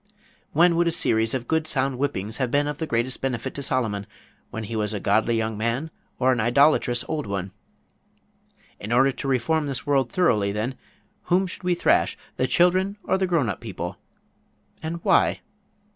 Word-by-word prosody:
When 170 Hz, +2 st, +4 dB
would 170 Hz, 0 st, +3 dB
a -, -, +2 dB
series 115 Hz, -8 st, +1 dB
of 125 Hz, -2 st, -4 dB
good 160 Hz, -1 st, 0 dB
sound 135 Hz, -2 st, 0 dB
whippings 110 Hz, -6 st, -2 dB
have 130 Hz, -3 st, 0 dB
been 145 Hz, +3 st, +2 dB
of 150 Hz, 0 st, -4 dB
the 160 Hz, -, -2 dB
greatest 120 Hz, +1 st, -1 dB
benefit 130 Hz, -1 st, -2 dB
to 140 Hz, -, -5 dB
Solomon, 110 Hz, -7 st, -1 dB, 0.4 s
when 110 Hz, -, -5 dB
he 110 Hz, +2 st, -5 dB
was 105 Hz, 0 st, -1 dB
a -, -, -2 dB
godly 110 Hz, +4 st, +2 dB
young 110 Hz, -1 st, -2 dB
man, 120 Hz, +8 st, -1 dB, 0.3 s
or 130 Hz, 0 st, +3 dB
an 125 Hz, -, 0 dB
idolatrous 120 Hz, +1 st, +3 dB
old 150 Hz, -8 st, -3 dB
one? 100 Hz, -1 st, -3 dB, 1.3 s
In 105 Hz, -, -6 dB
order 130 Hz, +3 st, +4 dB
to 135 Hz, -, -6 dB
reform 145 Hz, +4 st, +1 dB
this 135 Hz, -2 st, -3 dB
world 135 Hz, -4 st, +1 dB
thoroughly, 105 Hz, -, +2 dB
then, 110 Hz, +6 st, -2 dB, 0.5 s
whom 185 Hz, +2 st, +2 dB
should 180 Hz, -, -8 dB
we 180 Hz, -1 st, +1 dB
thrash, -, -, +2 dB, 0.2 s
the 130 Hz, -, +1 dB
children 185 Hz, +6 st, +2 dB
or 190 Hz, -, 0 dB
the 190 Hz, -, +1 dB
grown 165 Hz, -8 st, +1 dB
up 100 Hz, -, -3 dB
people? -, -, -6 dB, 0.8 s
And 165 Hz, +1 st, -5 dB
why? -, -, +3 dB
130 Hz, 185 wpm, -24 LUFS, 115-160 Hz, 1.3 s, When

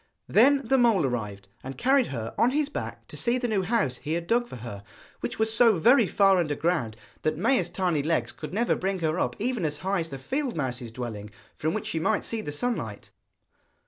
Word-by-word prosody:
Then 275 Hz, +5 st, +5 dB
the 265 Hz, 0 st, +3 dB
mole 230 Hz, -, +4 dB
arrived, 105 Hz, -6 st, -4 dB, 0.2 s
and 135 Hz, +1 st, -7 dB
carried 265 Hz, 0 st, +3 dB
her 115 Hz, -4 st, -5 dB
on 235 Hz, -, +3 dB
his 290 Hz, +2 st, 0 dB
back -, -, -6 dB
to -, -, -10 dB
see 240 Hz, +1 st, +1 dB
the 250 Hz, -1 st, -1 dB
new 210 Hz, -4 st, +1 dB
house 190 Hz, -, 0 dB
he 155 Hz, -, -4 dB
had 170 Hz, 0 st, -2 dB
dug 240 Hz, +6 st, +1 dB
for -, -, -9 dB
her, 110 Hz, -4 st, -8 dB, 0.4 s
which -, -, -4 dB
was 220 Hz, 0 st, +1 dB
so 225 Hz, -4 st, +5 dB
very 235 Hz, -, +5 dB
far 195 Hz, -1 st, +4 dB
under 155 Hz, -5 st, 0 dB
ground 140 Hz, -10 st, -1 dB, 0.2 s
that 155 Hz, -, 0 dB
Maia's 190 Hz, -2 st, +2 dB
tiny 175 Hz, -4 st, 0 dB
legs 160 Hz, +3 st, 0 dB
could 155 Hz, -, -8 dB
never 230 Hz, +6 st, +1 dB
bring 195 Hz, +1 st, -1 dB
her 160 Hz, +2 st, 0 dB
up -, -, 0 dB
even 235 Hz, -2 st, -2 dB
as 150 Hz, -2 st, -1 dB
high 195 Hz, 0 st, +1 dB
as 165 Hz, -1 st, -3 dB
the 135 Hz, -, -6 dB
field 260 Hz, -, -3 dB
mouse's 125 Hz, -5 st, -3 dB
dwelling, 110 Hz, -4 st, -6 dB, 0.3 s
from 155 Hz, +2 st, -1 dB
which -, -, -3 dB
she 160 Hz, -, -2 dB
might 210 Hz, +6 st, +1 dB
see 225 Hz, -1 st, -3 dB
the 150 Hz, -, -5 dB
sunlight. 145 Hz, -, -4 dB
180 Hz, 220 wpm, -27 LUFS, -, 0.4 s, Then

